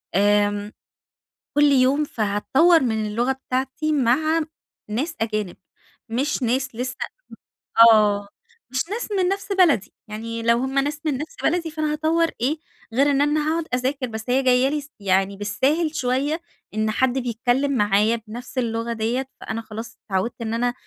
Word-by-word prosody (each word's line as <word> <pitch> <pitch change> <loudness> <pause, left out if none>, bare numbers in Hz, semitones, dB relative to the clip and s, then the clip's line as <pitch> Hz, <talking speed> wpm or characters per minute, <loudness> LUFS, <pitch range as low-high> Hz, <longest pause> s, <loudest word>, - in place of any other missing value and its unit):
آمم، 205 +1 +2 0.8
كل 295 - +5
يوم 270 +2 +4
فهتطوَّر 265 - +3
من 220 -3 0
اللغة 235 +5 0
بتاعتي 265 +3 -2
مع 305 +4 +2 0.5
ناس 285 +11 -2
أجانب، 215 -4 -2 0.5
مش 260 +3 -1
ناس 255 +1 0
لسه 250 +2 -3 1.0
آه، 205 -2 +3 0.4
مش 260 - -1
ناس 445 +4 -3
من 375 -3 +1
نفس 395 +1 -3
بلدي، 330 - +3
يعني 230 +2 -5
لو 235 0 +4
هم 265 +2 0
ناس 290 +2 -2
من 290 -4 0
نفس 300 +4 -7
بلدي 335 -1 +1
فأنا 310 -1 -1
هاطوّر 320 +2 +1
إيه 290 +6 0 0.3
غير 280 +4 +3
إن 280 0 +2
أنا 300 +1 +1
هاقعد 330 0 -1
أذاكر، 255 +1 -1
بس 220 +1 -7
هي 265 +2 +2
جاية 255 +1 +4
لي 295 +1 -1
س 285 - -14
يعني 195 0 +1
بالساهل 290 - 0
شوية 280 +5 0 0.3
إن 215 0 0
حد 260 +3 +1
بيتكلِّم 245 +3 0
معايا 210 -1 +2
بنفس 245 +4 -9
اللغة 230 -1 -1
ديَّة، 235 +4 -1
فأنا 225 +1 -4
خلاص 225 +1 -8
اتعوِّدت 195 +4 -2
إن 225 -1 -3
أنا 240 +1 0
255 Hz, 155 wpm, -23 LUFS, 220-295 Hz, 1.0 s, كل